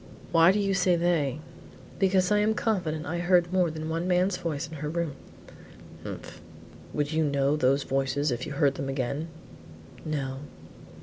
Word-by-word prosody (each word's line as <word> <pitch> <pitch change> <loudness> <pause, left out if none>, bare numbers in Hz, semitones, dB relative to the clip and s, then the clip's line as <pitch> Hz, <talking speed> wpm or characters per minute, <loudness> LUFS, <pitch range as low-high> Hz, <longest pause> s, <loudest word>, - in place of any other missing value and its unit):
"Why 165 +1 +6
do 200 - 0
you 200 -1 +1
say 185 -2 +3
they?" 160 -5 0 0.6
"Because 190 0 +3
I 210 - +4
am 215 +1 +2
confident 175 -10 -1
I 170 +3 -3
heard 175 0 +3
more 180 -2 +3
than 155 0 -5
one 165 +2 -2
man's 180 +1 +2
voice 165 -3 -3
in 160 0 -9
her 150 +1 -4
room." 165 -2 -2 0.9
"Humph! - - -8 0.5
Would 145 0 -1
you 160 0 +1
know 140 -1 +2
those 140 -1 +2
voices 135 +2 0
if 120 +1 -3
you 150 - -5
heard 140 -1 +2
them 135 0 -4
again?" 135 +4 -2 0.8
"No." 135 -4 -3
160 Hz, 170 wpm, -27 LUFS, 140-180 Hz, 0.9 s, Why